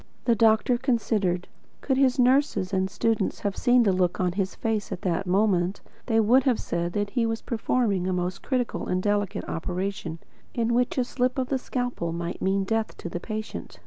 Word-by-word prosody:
The 235 - +4
doctor 225 +2 +3
considered. 215 -8 0 0.3
Could 265 - +1
his 260 -1 +3
nurses 250 -7 +2
and 190 0 +1
students 220 0 0
have 200 -2 -1
seen 245 -1 +4
the 200 -4 +3
look 180 -1 +1
on 180 -1 +1
his 190 +1 -2
face 220 -3 -2
at 185 0 -5
that 185 +1 -1
moment, 190 -1 +2 0.3
they 225 -2 +3
would 235 +5 +5
have 255 -4 +2
said 170 0 -2
that 205 -1 -1
he 235 -1 +1
was 225 0 -3
performing 220 -5 0
a - - 0
most 180 +1 -2
critical 250 -3 -2
and 180 - 0
delicate 205 -1 0
operation, 180 0 -3 0.4
in 235 0 +1
which 245 +2 +1
a 255 - +3
slip 250 +1 -1
of 255 -1 -1
the 270 - 0
scalpel 245 -10 -3
might 170 +1 -4
mean 195 +1 +1
death 225 +2 -1
to 175 - -6
the 175 - -4
patient. 215 +4 -6
210 Hz, 195 wpm, -26 LUFS, 185-245 Hz, 0.4 s, would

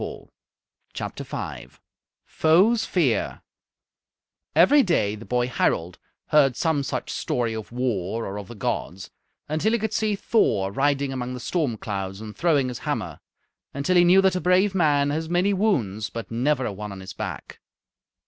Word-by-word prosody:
Foes' 200 +9 +4
fear - - 0 1.1
Every 290 0 +6
day 165 - +1
the 110 +2 -9
boy 125 0 +1
Harald 90 -7 -1 0.3
heard 140 -4 +4
some 160 -3 +1
such 140 - -4
story 120 -2 -1
of 110 -1 -7
war 115 -3 -2
or 100 +1 -5
of 100 - -9
the 120 - -10
gods, 95 -2 -4 0.4
until 155 +9 0
he - - +3
could 220 -1 -3
see 215 -1 +1
Thor 110 - +1
riding 140 +3 0
among 125 -1 -4
the - - -6
storm 135 -4 -1
clouds 95 -2 -4
and 110 -1 -8
throwing 145 -7 +2
his 125 - -6
hammer, - - -3 0.6
until 140 +6 0
he 175 - +7
knew 180 +2 +6
that 190 -1 +3
a 180 - -1
brave 185 +2 +3
man 145 -5 +2
has 160 +2 -3
many 180 +3 +2
wounds, 115 - 0
but 115 -1 -7
never 130 +3 +1
a 105 - -3
one 105 +1 -7
on 95 - -8
his 95 - -9
back. - - -7
135 Hz, 160 wpm, -24 LUFS, 110-175 Hz, 1.1 s, he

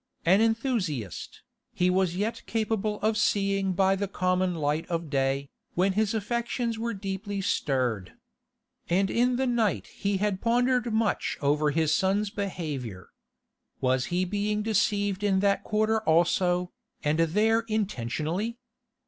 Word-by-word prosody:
An 190 +5 +5
enthusiast, 225 - -1 0.3
he 180 0 +2
was 185 -2 +1
yet 210 +5 -2
capable 215 -1 -1
of 215 +1 +2
seeing 195 -2 +1
by 190 +1 +3
the 200 +1 -2
common 185 -1 0
light 150 0 -1
of 165 -3 -3
day, 135 0 0 0.2
when 190 +2 +2
his 215 +2 +1
affections 235 +1 -2
were 230 0 -2
deeply 195 +1 -4
stirred. 130 - -1 0.8
And 190 +3 +2
in 245 +1 +2
the 265 +2 0
night 235 -4 +1
he 200 -1 -2
had 200 -1 -1
pondered 245 0 +2
much 220 -1 0
over 150 +1 +2
his 155 +1 +1
son's 200 +2 +1
behaviour. 150 - -5 0.7
Was 130 0 +1
he 180 +1 0
being 210 +2 -1
deceived 205 -2 +1
in 195 -2 +3
that 200 0 +2
quarter 215 +1 +1
also, 175 0 +2 0.3
and 150 +2 +1
there 210 +8 +3
intentionally? 195 - -2
195 Hz, 135 wpm, -27 LUFS, 165-215 Hz, 0.8 s, An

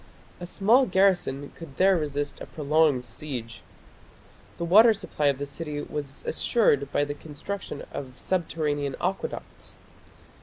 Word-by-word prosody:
A 175 - -6
small 225 +8 +4
garrison 180 -8 +2
could 155 -5 -11
there 190 +1 +5
resist 145 -3 -2
a - - -7
prolonged 150 -3 +2
siege. 120 -4 -7 1.0
The 170 - -2
water 215 +6 +7
supply 150 -6 -1
of 140 -2 +2
the 145 - -3
city 150 +1 -5
was 145 -2 -6
assured 145 - +2
by - - +2
the 145 - -4
construction 150 +3 -7
of 130 -2 -7
subterranean 150 -6 -1
aqueducts. 190 +2 -4
150 Hz, 130 wpm, -26 LUFS, 140-185 Hz, 1.0 s, water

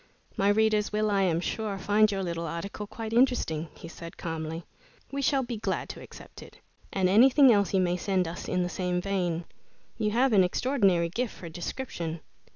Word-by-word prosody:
"My 200 +1 +2
readers 215 0 +2
will, 215 0 +1
I 200 -1 +2
am 170 -3 +2
sure, 205 +2 -3
find 210 +2 +3
your 195 -1 -2
little 170 -1 -3
article 200 +6 -5
quite 225 +1 -6
interesting," 235 - +2
he - - -10
said 165 0 -10
calmly. 160 0 -4 0.5
"We 280 0 -2
shall 270 0 +2
be 240 -2 -4
glad 215 - -2
to - - -7
accept - - -12
it, - - -13 0.3
and 190 -1 +1
anything 250 +6 +6
else 200 -4 +2
you 190 - +3
may 180 0 +1
send 185 -1 0
us 170 +2 -6
in 180 0 0
the - - -1
same 180 0 -1
vein. 180 -3 -1 0.5
You 215 -1 +1
have 245 +3 +2
an 195 -3 +6
extraordinary 190 -4 +2
gift 235 +6 -3
for 170 - -9
description." 170 -2 -5
195 Hz, 190 wpm, -28 LUFS, 175-220 Hz, 0.5 s, anything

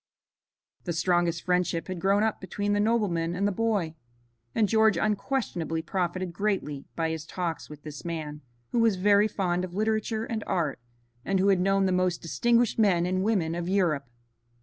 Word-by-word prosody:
The 175 - -1
strongest 170 0 +1
friendship 180 -2 0
had 185 -2 -5
grown 200 +3 +3
up 220 -1 -1
between 205 +2 -2
the 205 - +2
nobleman 200 -7 +1
and 200 +3 +1
the - - +1
boy, 205 -6 0 0.6
and 215 - +3
George 220 -2 +4
unquestionably 195 -6 -1
profited 180 +1 -2
greatly 180 -8 -2
by 165 -1 0
his 160 -1 -4
talks 170 0 -4
with 150 -1 -11
this 150 -2 -8
man, 155 -3 -5 0.3
who 240 - +1
was 225 -3 +4
very 205 +2 +4
fond 180 -4 -1
of 180 -1 -6
literature 220 +1 0
and 220 -2 -3
art, 160 -8 -1 0.4
and 195 +4 0
who 195 +2 +3
had 190 -2 +4
known 195 +1 +2
the 190 - +1
most 180 -1 +1
distinguished 235 +7 +1
men 185 -5 +4
and 185 +1 0
women 190 -7 +1
of 175 +1 -3
Europe. 165 -9 +1
185 Hz, 175 wpm, -27 LUFS, 170-210 Hz, 0.6 s, George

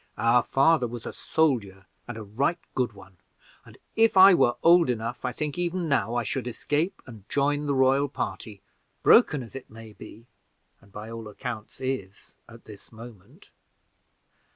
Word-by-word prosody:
Our 115 +3 +3
father 135 +1 +2
was 120 0 -8
a - - -6
soldier, 110 -12 -1 0.2
and 120 -2 -7
a 110 - -7
right 130 - -1 0.2
good 125 -4 -1
one, 95 -2 -16 0.5
and - - -17 0.2
if 225 -3 +3
I 190 +1 +9
were 120 -8 +3
old 170 -3 +5
enough 115 0 -3
I 125 - -1
think 150 +5 -4
even 175 0 -2
now 140 -5 0
I 120 - 0
should 125 +3 -4
escape 150 - -2
and 110 -6 -14
join 145 +1 0
the 140 - 0
royal 135 +2 +2
party, 105 -6 -6 0.4
broken 140 -4 +5
as 115 - -13
it 135 - -9
may 110 -1 -13
be 115 +2 -13 0.6
and 100 - -22
by 105 +3 -9
all 115 -1 -8
accounts 110 +1 -8
is, 130 -7 -5 0.2
at 115 0 -15
this 105 -2 -14
moment. 115 -4 -15
120 Hz, 170 wpm, -26 LUFS, 110-145 Hz, 0.6 s, I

